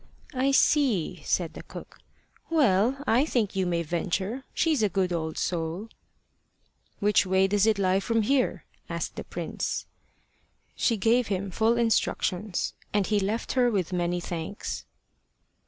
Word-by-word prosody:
"I 260 +1 +1
see," 270 - +2
said - - 0
the - - -8
cook. - - -11 0.5
"Well, 270 - +3
I 240 +5 +4
think 235 -10 0
you 190 -1 +1
may 170 -1 0
venture. 190 - -2
She's 315 -7 +1
a 210 - +3
good 185 -1 0
old 160 -2 -3
soul." 175 +5 -2 1.1
"Which 205 +1 +3
way 190 0 +3
does 205 +2 +2
it 220 -2 +3
lie 190 -1 +2
from 225 +2 +1
here?" 265 +3 +1 0.2
asked - - -3
the - - -5
prince. - - -4 0.9
She 230 - +1
gave 230 +3 +3
him 195 -1 -2
full 225 +5 +2
instructions; 210 -4 0 0.2
and 205 -2 +2
he 210 +1 +1
left 205 +4 -2
her 250 -2 +3
with 190 -5 -1
many 175 0 0
thanks. 175 +3 -5
205 Hz, 145 wpm, -27 LUFS, 185-235 Hz, 1.1 s, I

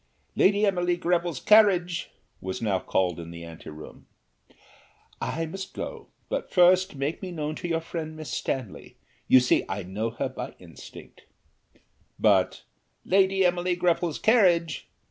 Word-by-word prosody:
"Lady 205 +2 +4
Emily 175 -3 +1
Greville's 175 -4 0
carriage!" 190 -5 +4 0.3
was 95 0 -4
now 100 -4 0
called 90 -3 -1
in 85 0 -8
the 85 0 -9
anteroom. 80 -2 -11 1.1
"I 165 +1 -2
must 190 +4 -7
go, - - -6 0.2
but - - -3
first 185 0 +4
make 140 +4 -3
me 185 -2 -6
known 155 -2 -3
to - - -5
your 165 -1 0
friend 160 -1 -6
Miss 155 -1 -7
Stanley, 130 -7 -4 0.3
you 130 - +7
see 125 - +2
I 100 0 -3
know 105 +5 -3
her 115 - -3
by - - -7
instinct;" - - -14 0.9
but - - +2 0.4
"Lady 190 0 +3
Emily 180 0 +1
Greville's 175 -2 0
carriage!" 180 - +2
170 Hz, 140 wpm, -26 LUFS, 125-180 Hz, 1.1 s, you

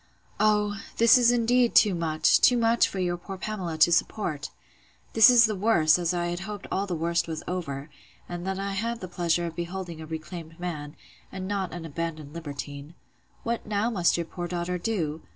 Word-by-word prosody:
Oh! 210 0 +2 0.2
this 230 +2 +7
is 240 -2 +5
indeed 245 0 +2
too 210 -3 +6
much, 160 -2 +2
too 250 - +5
much, 230 0 +3
for - - -7
your 175 -1 -1
poor 190 +2 -8
Pamela 185 -5 -4
to 160 +2 +5
support! 160 -4 -1 0.6
This 225 +1 +8
is 240 -2 +7
the 215 - -1
worse, 185 -6 +3
as 170 0 0
I 175 -1 -1
hoped 195 +3 -7
all 195 +1 -1
the 180 - -2
worst 170 +1 0
was 160 -1 -5
over; 145 -6 -4 0.4
and 175 0 -6
that 190 0 -2
I 195 0 -3
had 230 +4 -2
the 185 - -6
pleasure 175 -1 0
of 165 -1 -6
beholding 175 -1 -5
a 155 - -8
reclaimed 160 +1 -8
man, 155 -4 -5 0.4
and 190 -1 -6
not 195 -2 -2
an 170 -1 -7
abandoned 155 -2 -5
libertine. 145 -1 -7 0.5
What 235 -1 -3
now 210 +3 0
must 175 -6 +2
your 170 - -2
poor 175 +1 -6
daughter 175 +1 -3
do? 165 -7 -2
175 Hz, 190 wpm, -26 LUFS, 165-210 Hz, 0.6 s, This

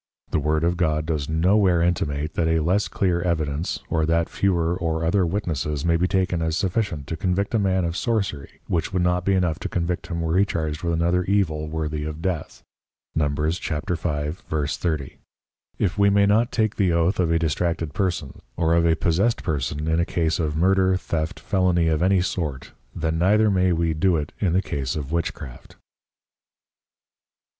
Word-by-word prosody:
The - - +1
Word 75 +2 0
of 85 +1 +1
God 80 -3 +1
does 75 -3 -2
no 85 +5 +3
where 95 -5 +3
intimate, 75 -3 -1
that 80 - 0
a 80 0 +2
less 95 +6 +1
clear 90 -3 0
Evidence, 80 -2 -1
or 80 -1 0
that 85 0 +1
fewer 85 -3 +1
or 80 -2 -2
other 90 +1 +2
Witnesses 75 -6 -2
may 85 -1 +3
be 90 +2 +2
taken 95 -3 0
as 80 0 0
sufficient 95 -7 -1
to 80 - -4
convict 95 +4 -1
a 115 - +3
Man 95 -2 +1
of 85 0 -2
Sorcery, 100 - -2
which 85 +3 -1
would 90 -2 0
not 90 0 +1
be 100 - +3
enough 85 -4 0
to - - -4
convict 85 0 -2
him 85 -1 -3
were 80 +3 +1
he - - +6
charged 80 -5 -2
with 85 -1 -1
another 85 +2 +1
evil 80 -6 0
worthy 75 -1 -3
of 75 0 -5
Death, 85 -2 -4 0.5
Numb. 75 -2 0
35.30. 75 -1 -2 0.6
if 100 +1 -1
we 100 0 +5
may 100 0 +4
not 110 +4 +3
take 110 -2 0
the 95 -4 +2
Oath 85 +4 +1
of 85 -3 +2
a 85 - +3
distracted 80 -1 -1
Person, 90 -6 -2 0.2
or 80 -1 +2
of 85 0 +3
a 80 - +4
possessed 95 +9 +1
Person 75 -1 -2
in 80 +1 +2
a - - +3
Case 85 -2 0
of 75 -2 -1
Murder, 95 +2 +3
Theft, 85 +1 -3
Felony 90 -4 +1
of 80 0 0
any 95 0 +3
sort, 80 -7 -3 0.2
then 80 -1 -1
neither 105 +4 +4
may 95 -1 +2
we 85 -1 +1
do 85 +3 +2
it 75 -1 -4
in 90 -5 +1
the 95 +2 +2
Case 70 -2 -3
of 75 -2 -5
Witchcraft. 80 -6 -4
85 Hz, 185 wpm, -23 LUFS, 80-95 Hz, 0.6 s, he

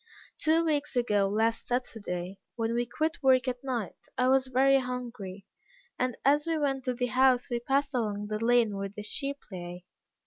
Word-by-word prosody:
Two 320 +1 +3
weeks 295 -3 0
ago 210 -5 +2
last 225 +2 0
Saturday, 200 -7 -3 0.2
when 230 -1 -1
we 240 0 0
quit 315 +6 -2
work 260 -1 +4
at 250 0 -3
night, 240 -8 -4
I 255 0 +3
was 265 0 +3
very 270 +2 +4
hungry, 240 -7 -6 0.5
and 255 -1 0
as 295 +3 +4
we 325 -1 +1
went 275 -3 0
to 255 -1 0
the 250 +1 0
house 255 0 +3
we 240 - 0
passed 275 +3 0
along 210 -4 -1
the 215 +1 -3
lane 235 -3 +3
where 195 0 -3
the 210 +1 -8
sheep 280 +6 -2
lay. 175 -1 -7
245 Hz, 180 wpm, -29 LUFS, 215-270 Hz, 0.5 s, work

